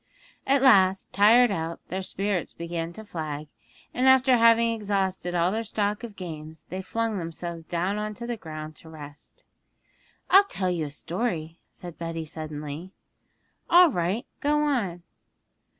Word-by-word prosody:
At 275 0 +3
last, 195 -7 +4
tired 225 +4 +6
out, 165 -3 -3
their 190 +1 -3
spirits 195 -1 -2
began 170 0 -4
to 220 +4 -10
flag, 155 -5 -5 0.4
and 255 +2 +2
after 260 0 +6
having 230 0 +5
exhausted 195 -4 -1
all 175 +1 +2
their 225 +2 -1
stock 210 0 -2
of 225 -4 -7
games 160 -4 -8
they 185 +1 -4
flung 225 +1 -2
themselves 165 -1 -6
down 180 +4 -1
on 215 0 -3
the 235 +1 -4
ground 155 -5 -8
to 160 - -14
rest. 150 -2 -11 0.9
'I'll 395 +1 +8
tell 185 - -2
you 165 -3 -1
a - - -5
story,' 165 +1 -3
said 175 -2 -11
Betty 165 -1 -4
suddenly. 155 +1 -6 0.8
'All 350 -1 +7
right, 185 +5 -1
go 295 +1 +2
on!' 205 - -1
185 Hz, 150 wpm, -26 LUFS, 165-230 Hz, 0.9 s, I'll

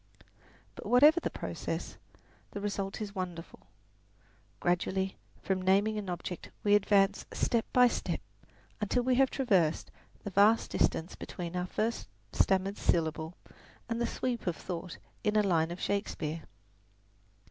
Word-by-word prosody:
But - - -9
whatever 295 +7 +7
the - - -2
process, - - -5 0.5
the 205 - -6
result 200 0 -3
is 205 -1 -4
wonderful. 180 -4 -6 1.0
Gradually 190 +2 0 0.3
from 190 -1 0
naming 200 +3 +3
an 200 -3 -6
object 175 0 -5
we 205 - +4
advance 200 -1 +4
step 230 -2 +1
by 250 0 +6
step - - -2 0.6
until 230 +4 +1
we 255 +1 +2
have 265 +1 +4
traversed 190 - +1 0.3
the 205 - -5
vast 205 +4 +4
distance 165 +2 0
between 175 -1 -6
our 180 0 -1
first 225 +5 -2 0.2
stammered 195 +1 +1
syllable 160 0 0 0.5
and 230 0 -2
the 235 - +1
sweep 240 -3 -3
of 175 - +1
thought 180 0 -6 0.3
in 210 -1 +1
a 210 - +5
line 165 -4 +2
of 175 +1 -6
Shakespeare. 165 -6 -2
195 Hz, 135 wpm, -31 LUFS, 180-215 Hz, 1.0 s, whatever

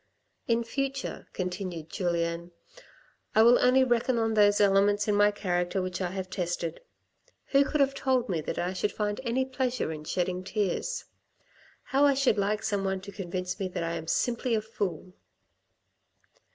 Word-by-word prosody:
" - - -47
In 235 - -1
future," 275 +3 -3
continued 180 -3 -4
Julien, 170 -1 -1 0.4
" - - -32
I 220 - +7
will 240 +2 +7
only 255 +1 +5
reckon 245 0 +1
on 225 -1 +1
those 205 -1 +4
elements 205 +1 +3
in 210 - +2
my 205 0 +5
character 180 -2 -1
which 185 0 -3
I 180 - 0
have 190 0 -4
tested. 175 -2 -3 0.7
Who 275 0 +5
could 295 +1 0
have 275 0 +3
told 260 -3 +1
me 170 -6 -1
that - - -4
I 180 +2 -1
should 205 +2 -1
find 210 +2 -2
any 255 +2 0
pleasure 255 -7 -2
in 155 -1 -6
shedding 180 +3 -2
tears? 210 - -2 0.8
How 275 +1 +1
I 285 -1 +5
should 260 -6 +2
like 210 +2 0
some 205 -3 0
one 190 -1 -1
to 200 +1 -9
convince 185 -2 -4
me 195 - -1
that 180 -2 -4
I 165 0 -2
am 160 - -5
simply 240 +5 0
a 215 - 0
fool 190 -5 -4
205 Hz, 180 wpm, -28 LUFS, 180-240 Hz, 0.8 s, I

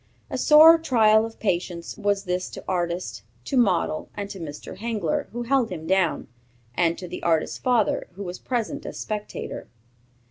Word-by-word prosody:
A - - -2
sore 320 +2 +8
trial 220 -7 +4
of 225 - -15
patience 175 -4 -2
was 200 -1 0
this 180 -1 -2
to - - -9
artist, 175 - -2 0.2
to - - -3
model, 190 -10 +1
to 200 -1 -5
Mr. 150 -3 -8
Hengler, 215 -8 -2
who 240 +1 -4
held 250 -1 +2
him 165 -4 -6
down, 185 -1 +1 0.5
and 170 +4 +1
to 180 - -7
the - - -7
artist's 165 -2 0
father, 245 -5 +1
who 200 +3 -7
was 180 -1 -6
present 240 -4 -3
as - - -7
spectator. 210 -1 -5
200 Hz, 165 wpm, -24 LUFS, 175-230 Hz, 0.5 s, sore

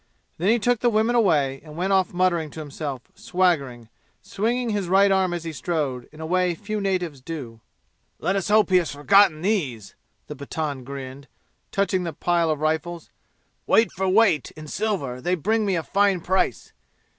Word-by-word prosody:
Then 185 +4 +1
he 230 - +4
took 245 +1 +1
the 240 - +3
women 220 +1 +2
away 145 - +2
and 155 -1 -12
went 190 +3 0
off 190 -1 +2
muttering 175 -3 +1
to 160 - -10
himself, 145 -3 -6
swaggering, 140 -11 0 0.4
swinging 235 +3 -1
his 200 -3 -2
right 195 +1 +5
arm 190 -2 +2
as 175 -1 -4
he 165 -1 -5
strode, 135 -4 -3
in 155 - -15
a 160 - -5
way 180 +1 +1
few 215 +3 -4
natives 180 -8 -2
do. 130 -7 -7 0.6
"Let 190 - -1
us 195 - -1
hope 210 -1 +3
he 185 - +6
has 170 -3 0
forgotten 165 +2 +4
these!" 140 - -1 0.3
the 150 - -8
Pathan 140 -1 -4
grinned, 135 0 -8 0.4
touching 195 -2 0
the 165 -2 -4
pile 170 +2 +1
of 155 -1 -1
rifles. 160 +2 -2 0.6
"Weight 225 -4 +4
for 190 +1 -1
weight 195 - +3
in 155 - -9
silver 150 - -2
they 180 +7 +1
will 165 - -13
bring 220 +1 +1
me 195 - +1
a 165 - -1
fine 200 0 +2
price! 190 +3 -1
175 Hz, 185 wpm, -24 LUFS, 150-195 Hz, 0.6 s, he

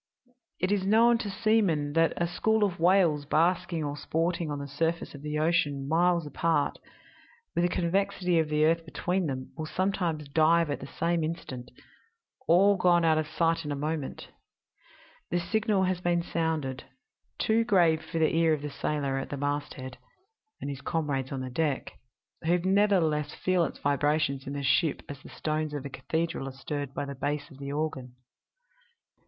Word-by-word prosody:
"It 185 +2 0
is 205 -2 +1
known 230 +4 +4
to 215 - -3
seamen 195 -9 +1
that 165 +1 +3
a 170 - +2
school 220 +5 +1
of 190 -5 0
whales 170 -4 +4
basking 165 +1 +1
or 145 -1 -3
sporting 165 +2 -1
on 145 - -3
the 140 0 -5
surface 165 +4 -2
of 140 - -10
the 150 0 -3
ocean, 150 -4 +1
miles 170 +1 +2
apart, 155 0 0 0.7
with - - +1
the - - +2
convexity 180 0 +1
of 160 -1 0
the 150 0 +3
earth 165 +1 +2
between 175 +3 -1
them, 130 -2 -5
will 155 -1 -5
sometimes 175 -5 -1
dive 160 +2 +3
at 145 - -2
the 135 - -8
same 170 +2 -1
instant 135 -6 -5 0.8
all 195 +4 +5
gone 175 -2 +4
out 160 -1 +4
of 155 - -2
sight 165 +1 +1
in 150 - -4
a - - -1
moment. 150 0 -4 1.0
The 175 - 0
signal 205 +2 +1
has 185 -1 0
been 175 -1 +1
sounded 160 -6 -2 0.5
too 225 +1 +2
grave 170 -8 +3
for 160 - -5
the 160 0 +2
ear 165 -1 +4
of 145 - -9
the 150 - -4
sailor 140 -3 -1
at - - -6
the 145 - -4
masthead 145 -2 -4 0.6
and - - -5
his 140 -1 -5
comrades 140 -5 -2
on 135 -1 -3
the 130 -1 -5
deck 145 0 -1 0.5
who 170 +2 +2
nevertheless 185 -5 +2
feel 185 -2 +1
its - - -6
vibrations 145 -1 0
in 140 - -4
the 140 0 -4
ship 140 +3 +2
as 140 -1 -8
the - - -12
stones 155 -1 -2
of 140 -1 -5
a - - -4
cathedral 165 -1 -2
are - - -5
stirred 140 +1 -5
by - - -2
the 140 - -5
bass 145 +2 -3
of 135 - -14
the 140 0 -5
organ. 140 -4 -3
160 Hz, 180 wpm, -28 LUFS, 145-175 Hz, 1.0 s, all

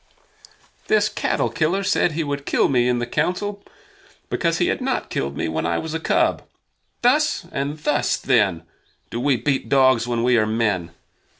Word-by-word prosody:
"This 430 - +3
cattle - - -1
killer 180 +5 0
said 190 -4 +1
he 165 +1 -1
would 140 -1 -4
kill - - +2
me 125 -2 +2
in 125 -1 +1
the 120 - -2
Council 180 - -2 0.7
because - - 0
he - - +2
had - - -1
not - - -2
killed 70 +1 -3
me - - -1
when 80 0 -2
I 85 0 0
was 160 -1 -4
a 160 - -2
cub. - - +1 0.6
Thus 295 +5 +2
and 140 +2 -3
thus, 150 -1 0
then, 100 -10 +1 0.5
do 120 - -3
we 135 0 +2
beat 135 +4 -1
dogs 130 -4 +4
when 120 -1 -1
we 125 0 +3
are 110 - +1
men. 105 -6 0
135 Hz, 180 wpm, -22 LUFS, 115-160 Hz, 0.7 s, dogs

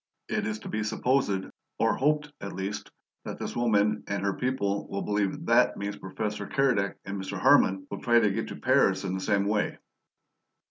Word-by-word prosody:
It - - -1
is 110 0 -2
to - - -8
be 110 - -2
supposed 110 -2 +1 0.3
or - - +3
hoped, 150 +1 +1
at 100 - -5
least 95 +2 -4 0.3
that - - -6
this - - -5
woman 105 -3 +2
and 100 -1 -2
her 100 -1 +1
people 100 -6 -1
will 100 - -3
believe 105 -2 -1
THAT - - +4
means 100 0 -3
Professor 105 +1 -4
Keredec 125 -8 +1
and 100 0 -4
Mr. 95 - -5
Harman 95 0 +4
will - - -5
try 120 -1 +5
to 105 -3 +3
get 110 +3 -2
to - - -6
Paris 95 0 +3
in 95 -2 -2
the 95 - -2
same 100 0 +1
way." 105 +1 0
105 Hz, 190 wpm, -28 LUFS, 100-115 Hz, 0.3 s, try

